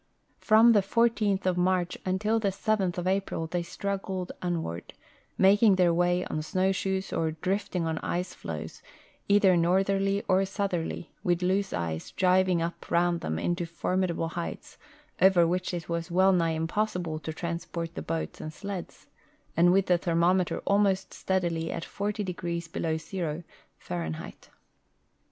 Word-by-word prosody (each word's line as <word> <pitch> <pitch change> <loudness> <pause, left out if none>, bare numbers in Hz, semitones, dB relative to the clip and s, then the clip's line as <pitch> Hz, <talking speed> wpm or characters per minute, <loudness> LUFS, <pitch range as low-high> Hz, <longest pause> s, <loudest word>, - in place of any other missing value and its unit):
From 225 +2 +6
the 210 -3 +5
14th 210 -1 +1
of 180 -1 +1
March 180 -1 +1
until 210 +5 +1
the 210 - 0
7th 195 -2 0
of 175 - -3
Ajiril 185 -4 -1
they 175 - 0
struggled 190 0 -4
onward, 160 - -3 0.4
making 200 +1 +5
their 180 -2 +3
way 175 +1 +2
on 155 - -3
snowshoes 190 +3 -1
or 160 -1 0
drifting 185 +1 -2
on 160 0 -1
ice 180 +1 -3
ffoes, - - -7 0.5
either 200 -2 +5
northerly 195 +3 +2
or 185 +1 +4
southerly, 190 -4 -3
with 175 0 +1
loose 195 +2 +1
ice 80 -2 -3
driving 185 -2 +2
up 170 +1 -6
around 170 0 +2
them 80 - -2
into 175 - -1
formi 185 +2 -1
dable 165 -1 -2
heights 170 0 -6 0.4
over 185 -2 +6
which 180 +2 -1
it 170 -3 -5
was 170 0 -3
wellnigh 175 -2 +3
impossible 170 -1 -1
to 160 +1 -5
trans 170 +1 -4
j)ort 170 -1 -5
the - - -5
boats 80 -1 -4
and 155 - -5
sleds, 200 -1 -7 0.5
and 175 +2 +5
with 195 +1 +3
the 180 -1 +3
thermometer 175 +2 +1
almost 195 -1 +2
steadily 170 -3 -1
at 165 - -4
40° 180 -5 -3
below 160 -1 -1
zero, 165 -1 -4 0.3
Fahrenheit. 80 -3 -6
180 Hz, 145 wpm, -28 LUFS, 170-195 Hz, 0.5 s, From